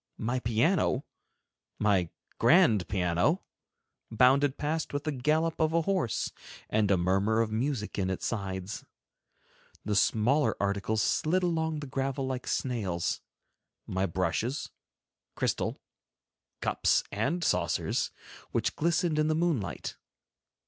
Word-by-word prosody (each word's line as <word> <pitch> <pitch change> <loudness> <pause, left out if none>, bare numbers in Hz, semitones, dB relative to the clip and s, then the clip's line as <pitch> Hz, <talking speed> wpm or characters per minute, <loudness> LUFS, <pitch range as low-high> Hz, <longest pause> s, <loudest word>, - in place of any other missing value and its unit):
My 120 +3 -1
piano, 125 - +1 0.7
my 95 -5 +2 0.3
grand 105 -7 +5
piano, 90 - +1 0.7
bounded 130 +4 +4
past 155 +1 -2
with 145 0 -2
the 155 - -1
gallop 155 +4 0
of 160 0 +2
a 165 0 +3
horse 185 - 0 0.4
and 105 -2 +2
a 100 - +4
murmur 95 +5 +2
of 115 -1 +1
music 115 -2 -2
in 95 -1 0
its 95 - -3
sides; 95 -2 -3 1.0
the 105 - 0
smaller 120 +9 +3
articles 100 +2 0
slid 180 +4 +1
along 160 -3 0
the - - -5
gravel 135 0 -2
like 130 -1 -4
snails, 100 -10 -1 0.6
my 95 +1 -1
brushes, 95 - -1 0.6
crystal, - - -1 0.8
cups - - +2
and 135 - -1
saucers, - - 0 0.4
which - - -1
glistened 170 -1 +1
in 155 - +3
the 155 - +2
moonlight. 140 - -1
125 Hz, 120 wpm, -29 LUFS, 100-155 Hz, 1.0 s, grand